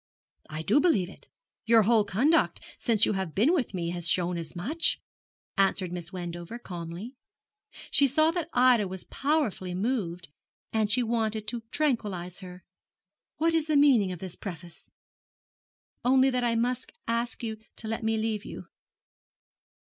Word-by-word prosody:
'I 155 +1 -5
do 215 - +4
believe 205 - +2
it. - - -15 0.4
Your 225 -1 +6
whole 220 0 +4
conduct 260 - +2 0.2
since 220 -3 +3
you - - 0
have 190 -5 -3
been 245 - +4
with 255 - 0
me 170 -2 -2
has 175 -2 -1
shown 180 0 +1
as 170 +1 -6
much,' 285 - +1 0.6
answered 195 -2 +2
Miss 175 -1 -5
Wendover, 175 +3 -6
calmly. 175 +2 -7 0.8
She 280 - +6
saw 310 +5 +3
that 340 -1 -3
Ida 245 -4 +4
was 185 0 -7
powerfully 275 - -1
moved, 185 - -2 0.4
and 220 -2 +1
she 245 +4 +4
wanted 220 -2 -1
to 235 -1 -4
tranquillise 205 - -1
her. 180 -1 -10 0.7
'What 330 +2 +2
is 320 -1 +1
the 305 -2 +3
meaning 255 -10 +5
of 180 - -5
this 180 0 -7
preface?' 175 -3 -9 1.1
'Only 260 +2 +4
that 250 -1 0
I 235 -1 +1
must 245 +2 -1 0.2
ask 235 +2 -2
you 220 -1 -3 0.2
to 220 - -7
let 225 +2 -2
me 220 0 +1
leave 220 -1 -1
you.' - - -8
220 Hz, 155 wpm, -28 LUFS, 180-250 Hz, 1.1 s, Your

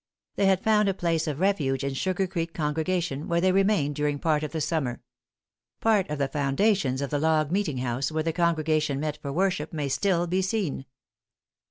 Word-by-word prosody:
They 195 - +2
had 190 0 +2
found 210 -2 +3
a 195 - -1
place 165 -3 0
of 150 -1 -3
refuge 150 -9 +1
in 140 0 -2
Sugar 185 +7 0
Creek 170 -2 -4
congregation, 160 0 -1
where 170 0 +1
they 185 +2 +3
remained 195 -7 +2
during 150 0 0
part 155 -1 +1
of 155 - -4
the 160 - -3
summer. 145 -6 -2 0.8
Part 215 -6 +2
of 150 - -2
the 140 -1 0
foundations 140 0 +1
of 140 - -4
the 145 - 0
log 155 -1 +2
meeting 180 -8 0
house 125 +3 -2
where 155 0 -1
the 165 0 -1
congregation 155 -4 +1
met 150 0 -2
for 140 - -4
worship 190 +5 0
may 150 -3 -2
still 175 +4 +1
be 185 +2 0
seen. 190 -8 -2
160 Hz, 195 wpm, -26 LUFS, 145-185 Hz, 0.8 s, found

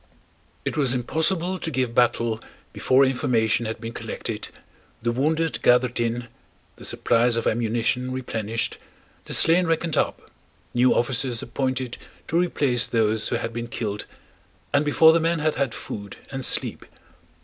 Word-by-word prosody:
It - - -2
was 135 -4 +2
impossible 165 +8 0
to - - -3
give 130 -5 -1
battle 115 -2 +1 0.3
before 130 +1 +4
information 120 -3 +1
had 115 +1 -5
been 115 0 -6
collected, 115 -1 -5 0.6
the 120 - +1
wounded 155 +6 0
gathered 125 0 +3
in, 120 +1 -1 0.5
the - - -8
supplies 120 +1 +2
of 115 - -2
ammunition 120 +3 0
replenished, 115 -3 -3 0.5
the - - -2
slain 170 +2 +6
reckoned 165 0 0
up, - - -1 0.4
new 125 +1 +4
officers 120 -1 0
appointed 130 0 -3 0.3
to 165 - +2
replace 140 -9 +1
those 110 -2 +1
who - - -1
had 115 -1 -3
been 120 +1 -4
killed, 105 -3 -4 0.7
and 145 +1 +4
before 160 +2 +6
the 165 - +3
men 165 +1 +1
had 155 0 0
had 135 -4 -1
food 100 -1 -7
and 135 -1 -4
sleep. - - +1
125 Hz, 150 wpm, -24 LUFS, 115-145 Hz, 0.7 s, slain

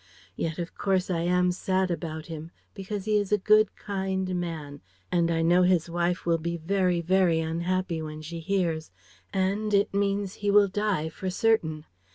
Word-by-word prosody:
Yet 165 -1 -3
of 170 -1 -5
course 190 -1 0
I 170 - 0
am 180 +1 +2
sad 185 +1 0
about 160 -2 -4
him, 160 -1 -7 0.2
because 200 0 -5
he 215 -1 +2
is 205 -1 -1
a 210 - +5
good, 215 +1 +4
kind 190 -2 -2
man, 160 -5 -4 0.3
and 170 -2 +2
I 165 -1 +1
know 175 +2 +4
his 180 -2 +2
wife 175 +1 0
will 165 -1 +2
be 170 +1 -3
very 180 +1 +1
very 175 -1 +3
unhappy 170 +1 -1
when 155 0 -7
she 165 +2 -6
hears 165 -3 -1 0.4
And 200 +2 0
it 200 +1 +2
means 200 -1 0
he 205 - +1
will 200 0 +5
die, 195 -5 -1
for 185 +4 -5
certain. 175 -7 +1
180 Hz, 180 wpm, -27 LUFS, 165-195 Hz, 0.4 s, a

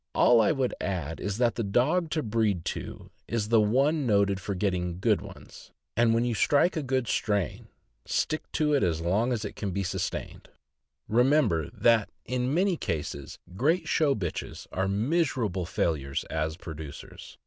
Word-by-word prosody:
All 120 -2 +6
I 110 - +3
would 135 -5 0
add 85 -5 -3
is 100 0 -3
that 120 -1 +2
the 115 - -2
dog 145 - +1
to 155 0 -1
breed 105 -6 0
to - - -8 0.2
is 110 -2 -2
the 115 -1 +5
one 135 +7 +2
noted 100 -2 +2
for 100 0 -4
getting 90 -2 -1
good - - +2
ones, - - -12 0.3
and 120 -1 +4
when 115 +1 +2
you 120 - 0
strike 145 - +3
a 160 - -1
good 130 -3 -1
strain 100 -9 -1 0.4
stick 155 - -1
to 150 -1 +1
it 140 - +3
as 80 -3 +1
long 100 +9 +1
as 110 -3 -1
it 105 - -6
can 100 - -3
be 100 +1 -2
sus 95 -1 -1
tained. - - -8 0.6
Remember 120 - +3
that, 115 -3 +3 0.2
in 125 +1 -1
many 180 +3 +2
cases, 75 - -4 0.2
great 160 - +1
show 150 -4 +2
bitches 90 -6 -5
are 95 +1 -1
miserable 110 - 0
failures 75 -5 -1
as 80 0 -2
producers. 80 -4 -9
110 Hz, 170 wpm, -28 LUFS, 90-130 Hz, 0.6 s, All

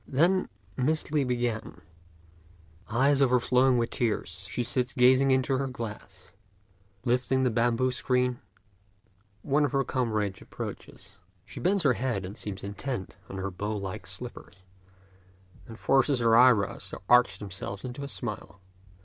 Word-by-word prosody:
Then 175 +7 +2 0.3
Miss 150 +4 0
Li 150 -2 +2
began 120 -3 -2 1.1
"Eyes 135 +5 +3
overflowing 125 0 +4
with 115 -1 0
tears, 115 -3 -2
she 120 - -1
sits 125 +2 -1
gazing 130 +2 +5
into 130 0 +2
her 135 - -1
glass, 105 -7 -8 0.7
Lifting 125 +2 +1
the 125 - +2
bamboo 120 +2 +2
screen, 125 -1 0 1.0
one 145 +2 +2
of 145 - 0
her 135 0 +2
comrades 110 -7 -1
approaches; 95 - -8 0.4
She - - -7
bends 190 +1 +1
her 140 -4 +4
head 115 -4 -2
and 95 +3 -7
seems 105 -3 -6
intent 100 +1 -4 0.2
on 95 - -6
her 100 +1 -3
bow 105 +4 -3
like 95 -2 -6
slippers, - - -7 1.1
And 115 - -10
forces 135 +2 +3
her 115 -1 +3
eyebrows 120 -5 +4
to - - -8
arch 125 -5 +5
themselves 100 +1 -6
into 125 +2 -6
a 140 - -5
smile. 105 -5 -6
125 Hz, 140 wpm, -28 LUFS, 105-130 Hz, 1.1 s, gazing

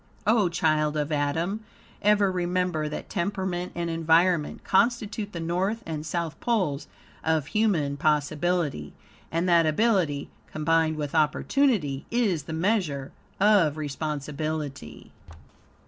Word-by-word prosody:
O 215 -4 +3
child 155 -2 +1
of 150 +1 -1
Adam! 160 +8 -1 0.4
Ever 205 -1 +4
remember 180 -3 -1
that 150 - -6
temperament 180 -1 -2
and 170 0 -2
environment 165 0 +2
constitute 215 -1 +1
the 170 - -6
north 185 +7 -1
and 155 -2 -4
south 165 0 -3
poles 185 - 0 0.4
of 160 -3 +1
human 160 -8 +1
possibility, 150 - 0 0.4
and 170 +2 0
that 170 -2 +4
ability, 160 -5 +1 0.2
combined 160 0 +1
with 145 -2 -4
opportunity, 155 - +1
is 205 - 0
the - - -7
measure 160 -6 0 0.3
of 190 -7 +4
responsibility. 150 - -4
165 Hz, 115 wpm, -26 LUFS, 150-190 Hz, 0.4 s, Ever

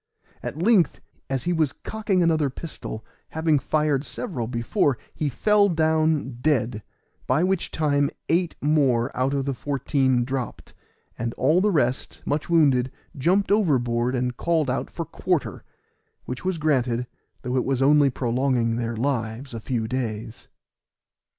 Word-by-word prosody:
At 155 - -5
length, 190 -3 +3 0.3
as 135 -2 -1
he 175 - 0
was 155 -5 +1
cocking 205 -4 -1
another 160 -4 +2
pistol, 130 -6 -7 0.2
having 160 -2 +1
fired 150 0 +1
several 125 - -4
before, 120 +2 0 0.2
he 150 - -1
fell 205 - +3
down 155 -5 +1
dead; 120 -6 +1 0.5
by 160 - +2
which 190 -1 0
time 145 -2 +1 0.2
eight 170 0 +1
more 135 -6 +2
out 130 +2 0
of 135 -1 -1
the 140 - -1
fourteen 130 -2 0
dropped, 130 -2 -5 0.5
and 115 0 -3
all 155 +7 +3
the 210 - +3
rest, 130 -8 -1
much 145 +3 -1
wounded, 135 -7 +3 0.2
jumped 185 +9 +2
overboard 125 - +2
and 125 -1 -1
called 160 -6 +1
out 130 - -2
for 165 - -5
quarter, 170 +1 -2 0.6
which 125 0 -6
was 185 -1 -1
granted, 125 -6 +1 0.4
though 125 0 -2
it 130 - +2
was 135 0 0
only 145 0 +5
prolonging 125 -2 0
their 115 -1 -2
lives 120 0 -2
a 115 - -4
few 115 -1 -2
days. 115 -2 -4
140 Hz, 145 wpm, -24 LUFS, 125-160 Hz, 0.6 s, only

